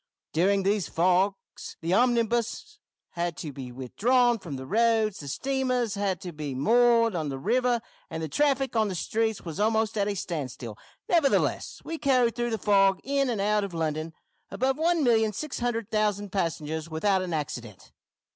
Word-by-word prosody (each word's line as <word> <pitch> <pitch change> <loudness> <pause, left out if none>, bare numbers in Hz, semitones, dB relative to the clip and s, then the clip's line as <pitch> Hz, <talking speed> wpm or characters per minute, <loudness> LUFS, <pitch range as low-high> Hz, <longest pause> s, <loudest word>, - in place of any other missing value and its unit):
During 195 +4 +2
these 200 -1 0
fogs 185 +3 0
the 165 +2 -1
omnibuses 240 - +1 0.3
had 170 -2 -3
to 145 +1 -5
be 130 -2 -7
withdrawn 230 - +2
from 165 -7 -7
the 130 0 -7
roads, 220 - +2
the 145 - -8
steamers 255 - -1
had 200 -4 -1
to 180 - -6
be 150 -4 -5
moored 230 - +4
on 160 -4 -2
the 135 - -4
river, 240 - +1 0.3
and 160 -1 -5
the - - -2
traffic 270 - +1
on 220 -1 +3
the 190 - -3
streets 220 +3 -1
was 165 +2 -6
almost 220 +1 +1
at 200 - +1
a 205 - -1
standstill, 130 - -5 0.3
nevertheless 325 -6 +1
we 325 -1 -5
carried 250 -4 +2
through 240 0 -1
the 225 - -1
fog, 195 -2 +3
in 275 0 0
and 230 -4 -1
out 210 +1 +2
of 195 -4 -5
London, 160 0 -2 0.4
above 265 +1 0
one 335 -1 +2
million 220 -3 +3
six 305 +7 -5
hundred 230 -3 -2
thousand 205 -2 0
passengers 160 -4 -2
without 190 +4 +1
accident!" 120 - -5
205 Hz, 170 wpm, -27 LUFS, 165-240 Hz, 0.4 s, moored